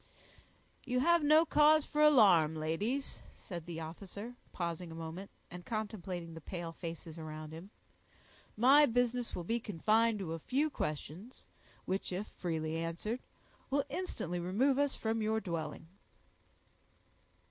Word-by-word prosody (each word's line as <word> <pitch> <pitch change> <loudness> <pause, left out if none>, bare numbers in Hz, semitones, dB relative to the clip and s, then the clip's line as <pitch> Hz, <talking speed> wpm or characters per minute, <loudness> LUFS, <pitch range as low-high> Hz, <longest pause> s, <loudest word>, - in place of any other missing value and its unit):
"You 250 -1 0
have 340 +3 +4
no 310 +3 +6
cause 305 0 +5
for 300 - -1
alarm, 195 - +6
ladies," 200 - -2
said 175 -3 -8
the 165 -1 -5
officer, 200 +8 -7 0.2
pausing 170 -1 -4
a - - -8
moment, 165 +4 -6 0.2
and 175 0 -8
contemplating 190 -6 -4
the 165 - -9
pale 170 0 -5
faces 165 -1 -7
around 155 -1 -7
him. 170 +5 -9 0.9
"My 275 +6 +7
business 245 0 0
will 175 - -4
be 230 +7 0
confined 220 +3 +2
to 180 -5 -4
a 165 - -4
few 285 - 0
questions, 165 - -5 0.4
which, 190 +1 -2
if 185 +3 -2
freely 160 -2 -3
answered, 170 +8 -3 0.5
will 280 +1 +2
instantly 180 - -3
remove 240 +11 +2
us 285 -1 +2
from 225 0 -1
your 220 +1 +1
dwelling." 165 -5 -4
190 Hz, 135 wpm, -34 LUFS, 165-245 Hz, 0.9 s, My